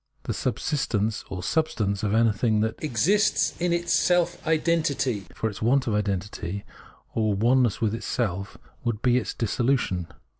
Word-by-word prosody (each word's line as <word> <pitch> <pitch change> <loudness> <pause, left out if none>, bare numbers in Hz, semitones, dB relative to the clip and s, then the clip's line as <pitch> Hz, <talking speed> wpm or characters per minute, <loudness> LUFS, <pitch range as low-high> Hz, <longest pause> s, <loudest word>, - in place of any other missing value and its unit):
The - - -2
subsistence 110 -8 -1
or 90 -1 -5
substance 105 - 0
of 105 0 0
anything 110 -1 +2
that 110 +5 -2
exists 160 - +2
is 175 0 +1
its 170 0 +1
self 175 -2 +2
identity; 155 - +1
for 110 - -1
its 105 - -6
want 130 +4 +3
of 115 - -1
identity, 100 -2 -2 0.5
or 110 -2 +1
oneness 120 +2 +2
with 110 -2 +1
itself, 105 -4 -3 0.3
would 115 -2 -2
be 125 -1 +4
its 125 - -2
dis 115 -4 -2
solution. 120 -9 +1
115 Hz, 150 wpm, -26 LUFS, 105-140 Hz, 0.5 s, be